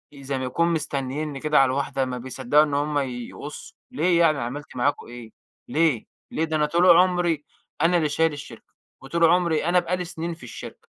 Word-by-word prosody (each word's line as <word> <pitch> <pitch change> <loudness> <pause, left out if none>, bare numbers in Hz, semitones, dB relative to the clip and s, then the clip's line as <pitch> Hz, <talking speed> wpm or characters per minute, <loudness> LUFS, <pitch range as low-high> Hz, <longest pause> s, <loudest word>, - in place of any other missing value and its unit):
زي 140 -1 -4
ما 130 - -3
يكون 170 +7 +1
مستنييني 145 -1 -3
كده 150 0 +3
على 135 - +6
الواحدة 135 0 -1
ما 125 -1 -4
بيصدّقوا 130 +3 +2
إن 150 -2 -3
هم 145 +1 0
يقصّوا 130 +2 -7
ليه؟ 170 +2 +2
يعني 155 -4 +3
عملت 130 +5 -6
معاكم 130 +4 -1
إيه؟ 120 -2 -10 0.4
ليه، 155 -6 +1 0.3
ليه؟ 160 - -1
ده 160 -1 -3
أنا 150 -1 +2
طول 170 +3 +5
عمري 175 -4 +2 0.4
أنا 170 +2 +4
اللي 155 -3 +1
شايل 160 +2 +1
الشركة 140 -6 -11 0.3
وطول 165 +5 +1
عمري 170 -1 +2
أنا 175 +1 +4
بقى 175 +1 -2
لي 180 - -4
سنين 170 0 -5
في 165 - -14
الشركة 125 - -10
150 Hz, 190 wpm, -24 LUFS, 135-165 Hz, 0.4 s, على